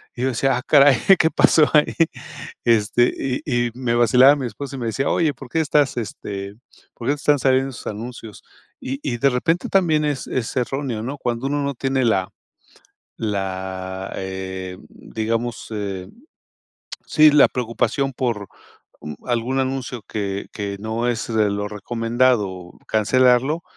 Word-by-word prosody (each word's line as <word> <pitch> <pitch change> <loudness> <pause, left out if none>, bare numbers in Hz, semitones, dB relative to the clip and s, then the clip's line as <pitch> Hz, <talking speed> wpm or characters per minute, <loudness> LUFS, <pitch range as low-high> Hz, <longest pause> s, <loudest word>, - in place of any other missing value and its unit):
y 120 - -6
yo - - +2
decía: 130 +1 +1
"Ah, - - -3
caray, 140 -4 +6 0.2
¿qué 160 - +3
pasó 155 -2 +5
ahí?," 150 -1 +3 0.7
este, 115 +1 +3 0.3
y 120 -4 +1
y - - -15
me 125 -2 -1
vacilaba 125 +4 +6
mi 135 -3 -4
esposa 140 +3 -7
y - - -6
me 120 - -4
decía: 135 +5 -1
"Oye, 155 -4 +1
¿por 135 -3 -12
qué 160 - -1
estás, 145 -4 +1
este, 100 -3 -5 0.4
por 120 - -7
qué 145 - +3
te - - -3
están 145 -1 +2
saliendo 135 +1 +2
esos 115 - -10
anuncios?", 110 0 -7 0.4
y 135 +2 -5
y 125 -5 -2
de 140 +3 +3
repente 165 +8 0
también 160 -6 +2
es 145 -2 -2
es 125 -1 -3
erróneo, 125 -3 -2
¿no?, 140 +4 -5
cuando 120 +1 -2
uno 145 0 -1
no 140 0 -1
tiene 135 0 0
la 95 -5 +1 0.9
la, 95 -2 -4
eh, 95 -1 -5
digamos, 115 +2 -4
eh, 100 -3 -4 1.0
sí, 155 -1 +6
la 150 - +6
preocupación 125 +3 -1
por, 115 -6 -2 0.5
mm, 75 -1 -7
algún 125 +2 -1
anuncio 130 -3 -3
que 100 -2 -3
que 100 -1 -4
no 115 +3 -2
es 115 -1 -2
de 105 -2 +3
lo 105 0 -2
recomendado, 115 -4 0 0.2
cancelarlo, 130 +7 +3
120 Hz, 160 wpm, -21 LUFS, 105-135 Hz, 1.0 s, caray